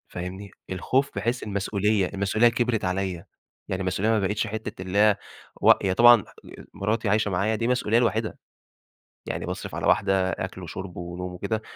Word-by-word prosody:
فاهمني، 95 +2 -7 0.2
الخوف 130 +9 0
بحيث 115 +5 -1
المسؤولية، 100 0 0
المسؤولية 100 +4 +3
كبرت 120 -3 0
عليّا، 90 -2 -2 0.4
يعني 95 0 -3
المسؤولية 95 +4 0
ما 110 - +3
بقيتش 105 +3 -1
حتة 110 -3 -6
اللي 95 +2 -3
هي 105 +1 +6
إيه 100 - +1 0.4
و - - +8
هي 95 -1 +1
طبعًا 120 +1 +7 0.5
مراتي 105 +2 -1
عايشة 105 0 +2
معايا 100 +4 +1
دي 115 +1 -1
مسؤولية 120 -2 +2
لوحدها، 115 -2 0 0.9
يعني - - -4
باصرف - - -5
على - - -3
واحدة 95 -1 +3
أكل 95 0 -5
وشرب 90 +1 -7
ونوم 90 +1 -6
وكده، 110 +4 -3
100 Hz, 165 wpm, -25 LUFS, 95-110 Hz, 0.9 s, و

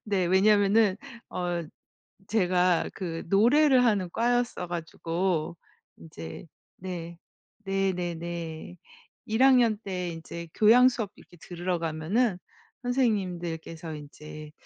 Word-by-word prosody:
네. 200 -4 0
왜냐하면은 205 +2 +4 0.3
어 175 -1 -2 0.7
제가 180 -4 +2
그 165 -3 -5
노래를 250 - +5
하는 205 -7 +2
과였어 240 -5 0
가지고 170 0 -2 0.4
인제 80 - -9 0.3
네. 170 -2 -7 0.5
네네네. 175 -4 -3 0.5
1 220 +4 +1
학년 245 -5 +5
때 185 -4 -4
인제 165 0 -8
교양 240 +4 +6
수업 225 -5 -4
이렇게 175 - -18
들으러 175 0 -3
가면은 170 +7 0 0.5
선생님들께서 175 - -2
인제 150 +1 -10
180 Hz, 215 characters per minute, -27 LUFS, 170-215 Hz, 0.7 s, 교양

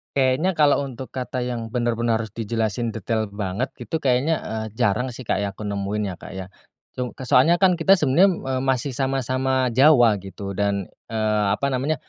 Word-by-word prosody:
Kayaknya 135 +7 +2
kalau 145 -1 +4
untuk 130 -1 -7
kata 130 0 -4
yang 120 -2 -4
benar-benar 120 -1 0
harus 110 -2 -7
dijelasin 115 0 -2
detail 110 0 -2
banget, 100 +5 -3
gitu, - - -5
kayaknya, 135 +5 +1
eee, 110 0 -4
jarang, 110 +5 +1
sih, 130 0 -8
Kak, - - -1
ya, 100 -1 -3
aku 105 - -8
nemuin, 100 0 -2
ya, - - -7
Kak, - - -10
ya. 95 -1 -5 0.5
Cu 125 -1 -5
soalnya, 130 +6 +5
kan, 180 -1 +3
kita 190 +4 +6
sebenarnya, 155 +3 +4
eee, 135 -8 -2
masih 135 +1 0
sama-sama 130 0 0
Jawa, 120 -5 +5
gitu, 95 +1 -7
dan, 100 -1 -1 0.2
eee, 110 -2 0
apa 140 0 -1
namanya, 135 +5 0
125 Hz, 180 wpm, -23 LUFS, 110-135 Hz, 0.5 s, kita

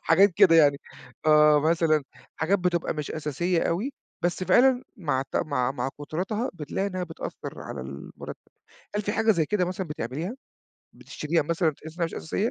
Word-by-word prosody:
حاجات 190 +5 +5
كده 185 -5 +7
يعني 145 -3 +5 0.5
آه 150 -1 +6
مثلًا 160 -1 +2 0.3
حاجات 190 +5 +2
بتبقى 175 -2 0
مش 150 -2 -4
أساسية 165 +3 -1
أوي، 210 +12 -1 0.3
بس 175 +2 0
فعلًا 255 +4 +5
مع 145 -9 0
الت 135 - -4
مع 130 -4 0
مع 130 -1 -2
كُترتها 190 - -2
بتلاقي 175 +4 -3
إنها 185 -2 -3
بتأثّر 160 -1 -7
على - - -6
المُرتب. 70 +2 -8 0.6
هل 210 - +1
في 205 - -2
حاجة 220 +1 +3
زي 165 -5 +1
كده 190 -1 +1
مثلًا 185 0 -4
بتعمِليها؟ 150 - -4 0.6
بتشتِريها 160 +1 -2
مثلًا 165 +2 +1
بتحسّي 155 +3 -12
إنها 170 - 0
مش 165 - -4
أساسية؟ 205 +8 -1
165 Hz, 170 wpm, -26 LUFS, 150-190 Hz, 0.6 s, كده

